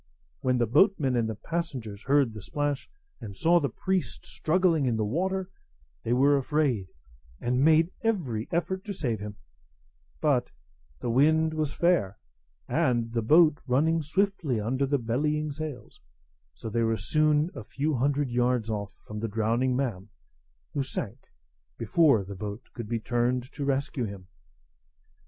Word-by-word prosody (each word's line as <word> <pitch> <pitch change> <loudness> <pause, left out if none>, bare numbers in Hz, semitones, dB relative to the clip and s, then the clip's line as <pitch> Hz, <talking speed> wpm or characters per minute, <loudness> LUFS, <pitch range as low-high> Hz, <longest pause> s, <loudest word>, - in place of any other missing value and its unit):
When 125 -1 +1
the 120 - +2
boatmen 145 - +3
and 115 -2 +1
passengers 130 -12 -4
heard 135 -3 +2
the 105 - -8
splash, 145 +5 -2 0.3
and 100 -3 -8
saw 175 +1 +4
the 140 -4 -1
priest 185 +9 -2
struggling 165 -4 +1
in 115 -2 +1
the 110 - 0
water, 190 - -1 0.5
they 115 - -3
were 140 +3 +4
afraid, 135 - 0 0.5
and 125 +2 +1
made 160 +3 +5
every 145 - -1
effort 175 +3 -1
to 205 - -4
save 120 - -2
him; 105 0 -6 0.8
but 130 -5 +2 0.5
the 120 - -1
wind 160 +5 +3
was 155 -2 -2
fair, 165 - +2 0.5
and 120 -2 +1
the 115 - +1
boat 155 +5 +5
running 160 +6 +2
swiftly 165 - 0
under 130 +6 0
the 140 +1 +2
bellying 150 +6 -1
sails; 145 -5 -7 0.5
so 110 - -8
they 115 +2 0
were 115 -1 +1
soon 155 - +2
a 110 - -7
few 145 +8 -2
hundred 140 +1 +1
yards 120 -2 +1
off 100 -2 -4
from 105 0 -6
the 115 - -2
drowning 115 +4 +1
man, 110 -7 -2 0.6
who 145 - 0
sank 125 -3 -5 0.5
before 125 0 +3
the 100 +1 -8
boat 105 +4 -6
could 115 -4 -7
be 115 - -1
turned 120 +2 0
to 140 - -4
rescue 135 -2 -1
him. 100 -3 -8
130 Hz, 150 wpm, -28 LUFS, 115-155 Hz, 0.8 s, made